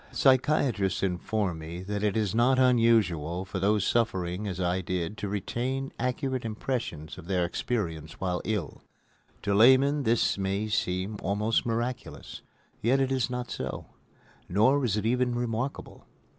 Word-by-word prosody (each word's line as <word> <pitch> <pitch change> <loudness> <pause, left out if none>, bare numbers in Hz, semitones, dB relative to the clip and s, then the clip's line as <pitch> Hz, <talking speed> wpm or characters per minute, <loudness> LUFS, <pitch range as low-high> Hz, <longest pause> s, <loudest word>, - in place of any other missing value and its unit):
Psychiatrists 130 - +2
inform 95 -1 -1
me 85 +3 -7
that 105 +1 -3
it 105 0 +1
is 105 -4 0
not 125 +3 +3
unusual 110 - +3
for 95 0 -4
those 100 +1 +2
suffering 100 -4 0
as 95 -2 -4
I 90 +1 0
did 90 +1 -3
to 100 - -3
retain 125 +7 -3
accurate 125 +1 -1
impressions 110 - -4
of 85 - -11
their 90 -2 +1
experiences 85 -6 -3
while 90 -2 -1
ill. 105 -10 -3 0.6
To 100 - +1
laymen 130 +7 +5
this 115 -5 +2
may 100 +2 -1
seem 95 0 -1
almost 105 +4 0
miraculous, 120 +2 -4 0.4
yet 125 +6 +3
it 135 -1 +1
is 130 -2 +1
not 125 -1 -4
so; 65 0 -4 0.6
nor 120 +10 +3
is 110 -4 +1
it 105 - -2
even 125 +1 +1
remarkable. 120 +2 -4
105 Hz, 145 wpm, -28 LUFS, 95-125 Hz, 0.6 s, laymen